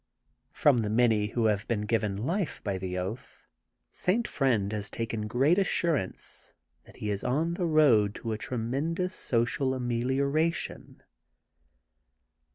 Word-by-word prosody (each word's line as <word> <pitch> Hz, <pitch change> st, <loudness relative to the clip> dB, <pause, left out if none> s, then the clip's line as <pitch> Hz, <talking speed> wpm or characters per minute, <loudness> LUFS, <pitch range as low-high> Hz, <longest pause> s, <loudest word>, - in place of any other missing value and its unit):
From 145 Hz, -4 st, +4 dB
the 105 Hz, -2 st, -1 dB
many 110 Hz, -2 st, +3 dB
who 115 Hz, +1 st, -1 dB
have 105 Hz, -1 st, +1 dB
been 115 Hz, -3 st, 0 dB
given 105 Hz, -2 st, 0 dB
life 170 Hz, -, -2 dB
by 100 Hz, -2 st, -2 dB
the 90 Hz, 0 st, -4 dB
oath, 95 Hz, +7 st, -6 dB, 0.5 s
St. 215 Hz, +6 st, 0 dB
Friend 110 Hz, -7 st, +1 dB
has 105 Hz, -1 st, -3 dB
taken 115 Hz, -2 st, -3 dB
great 135 Hz, -, +3 dB
assurance 170 Hz, -, -1 dB, 0.3 s
that -, -, -16 dB
he 105 Hz, -, -3 dB
is 100 Hz, -1 st, -2 dB
on 160 Hz, +7 st, 0 dB
the 175 Hz, 0 st, -1 dB
road 125 Hz, -11 st, +4 dB
to 115 Hz, -, -4 dB
a 110 Hz, -, -1 dB
tremendous 140 Hz, +11 st, -2 dB
sociaramelioration. 130 Hz, +5 st, 0 dB
120 Hz, 130 wpm, -29 LUFS, 105-150 Hz, 0.5 s, From